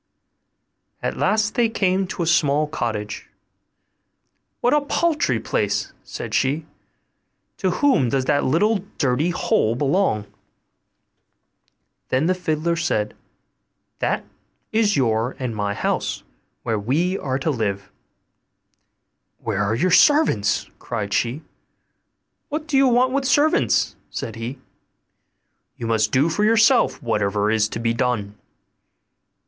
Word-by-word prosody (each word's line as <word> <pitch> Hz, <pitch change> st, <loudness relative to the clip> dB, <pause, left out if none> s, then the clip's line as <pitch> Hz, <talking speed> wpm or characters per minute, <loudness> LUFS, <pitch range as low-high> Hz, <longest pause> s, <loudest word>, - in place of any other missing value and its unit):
At -, -, -1 dB
last 215 Hz, 0 st, +1 dB
they 235 Hz, -2 st, +2 dB
came 190 Hz, -3 st, 0 dB
to 180 Hz, -, -3 dB
a -, -, -1 dB
small 150 Hz, -2 st, +3 dB
cottage. 110 Hz, -8 st, -4 dB, 1.3 s
'What 245 Hz, -, +2 dB
a 295 Hz, -, +4 dB
paltry 295 Hz, -, 0 dB
place!' 100 Hz, -1 st, -1 dB
said -, -, -7 dB
she; 145 Hz, +4 st, +1 dB, 0.9 s
'to 190 Hz, -, 0 dB
whom 180 Hz, -, +2 dB
does 130 Hz, +1 st, 0 dB
that 145 Hz, +1 st, +2 dB
little 205 Hz, +11 st, +2 dB, 0.2 s
dirty 140 Hz, +4 st, +1 dB
hole 115 Hz, -9 st, +1 dB
belong?' 140 Hz, -, +1 dB, 1.8 s
Then 130 Hz, +4 st, +1 dB
the 185 Hz, -, +3 dB
fiddler 170 Hz, -2 st, -1 dB
said, 110 Hz, -11 st, -1 dB, 0.8 s
'That -, -, -1 dB, 0.5 s
is 215 Hz, -5 st, +2 dB
your 115 Hz, -1 st, +1 dB
and 125 Hz, -4 st, -4 dB
my 100 Hz, -1 st, -2 dB
house, -, -, -2 dB, 0.4 s
where 110 Hz, -2 st, -1 dB
we 155 Hz, -, 0 dB
are 130 Hz, -2 st, -2 dB
to 145 Hz, +4 st, -1 dB
live.' 100 Hz, -6 st, -3 dB, 1.5 s
'Where 110 Hz, -4 st, -3 dB
are 105 Hz, +2 st, 0 dB
your 180 Hz, +10 st, +1 dB
servants?' 185 Hz, -, +4 dB
cried 105 Hz, -4 st, -4 dB
she. 120 Hz, +6 st, -1 dB, 1.1 s
'What 305 Hz, +1 st, -3 dB
do 275 Hz, -3 st, +3 dB
we -, -, +3 dB
want 250 Hz, +2 st, +3 dB
with 275 Hz, 0 st, 0 dB
servants?' 295 Hz, +3 st, +2 dB
said 110 Hz, -, -5 dB
he; 115 Hz, +4 st, -5 dB, 1.2 s
'you 115 Hz, -, -5 dB
must 110 Hz, -2 st, +1 dB
do 135 Hz, +5 st, +3 dB
for 170 Hz, +6 st, 0 dB
yourself 225 Hz, -, +3 dB
whatever 105 Hz, -2 st, 0 dB
is 110 Hz, -1 st, +2 dB
to 115 Hz, -, -5 dB
be 115 Hz, 0 st, 0 dB
done. 115 Hz, -4 st, -1 dB
140 Hz, 125 wpm, -22 LUFS, -, 1.8 s, a